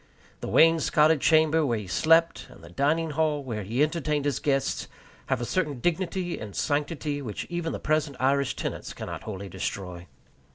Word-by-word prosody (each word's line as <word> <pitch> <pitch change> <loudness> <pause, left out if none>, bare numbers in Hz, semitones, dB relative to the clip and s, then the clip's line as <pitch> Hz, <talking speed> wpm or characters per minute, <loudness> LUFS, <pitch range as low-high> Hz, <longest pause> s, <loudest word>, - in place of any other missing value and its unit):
The - - -6
wainscoted 160 -2 +4
chamber 160 0 +4
where 120 -6 0
he 105 - -6
slept, 165 - +2
and - - -16
the - - -12
dining 155 +3 +1
hall 150 -1 0
where 115 -5 -4
he 115 +8 0
entertained 150 -2 -1
his 145 -4 0
guests, 135 -2 0 0.4
have 135 -2 0
a - - -1
certain 150 -4 -1
dignity 175 +3 -1
and 105 -2 -8
sanctity 145 0 -1
which 110 -7 -5
even 170 -1 -2
the - - -4
present 150 -3 0
Irish 140 +1 +1
tenants - - -5
cannot - - -6
wholly 100 -2 -6
destroy. 90 -1 -5
145 Hz, 170 wpm, -26 LUFS, 125-160 Hz, 0.4 s, wainscoted